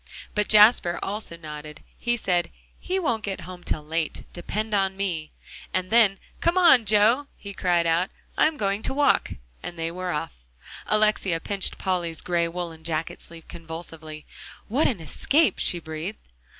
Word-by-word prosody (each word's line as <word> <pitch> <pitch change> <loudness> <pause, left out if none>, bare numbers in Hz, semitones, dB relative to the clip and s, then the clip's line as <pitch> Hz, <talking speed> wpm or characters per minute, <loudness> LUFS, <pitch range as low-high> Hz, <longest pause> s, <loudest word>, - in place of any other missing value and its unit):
But 210 -1 +1
Jasper 210 -4 +6
also 200 -4 -4
nodded. 150 -1 -9 0.2
He 240 0 0
said, 175 -5 0 0.3
"He 375 - -2
won't 235 - 0
get 195 -3 -4
home 180 +1 -10
till 150 - -2
late; 160 +1 -2
depend 215 +5 -3
on 195 -1 +1
me." 170 -6 -2 0.5
And 185 +1 -1
then 220 -4 +5 0.2
"Come 340 +2 +1
on, 275 -10 +6
Joe," 220 +7 +4
he 200 -1 -8
cried; 175 -3 +1 0.5
"I'm 310 0 +3
going 200 0 0
to 265 - -2
walk," 290 0 +3 0.3
and 175 - -7
they 165 0 -2
were 180 +1 -4
off. 150 -4 -2 0.6
Alexia 210 -5 +2
pinched 195 +3 -2
Polly's 175 -4 -2
gray 170 -1 +1
woolen 165 -2 -6
jacket 160 0 -3
sleeve 165 -1 -12
convulsively. 160 -2 -8 0.4
"What 265 +8 +2
an 215 -10 -2
escape," 280 - +2
she 175 - +2
breathed. 160 +5 -6
185 Hz, 155 wpm, -25 LUFS, 165-215 Hz, 0.6 s, Jasper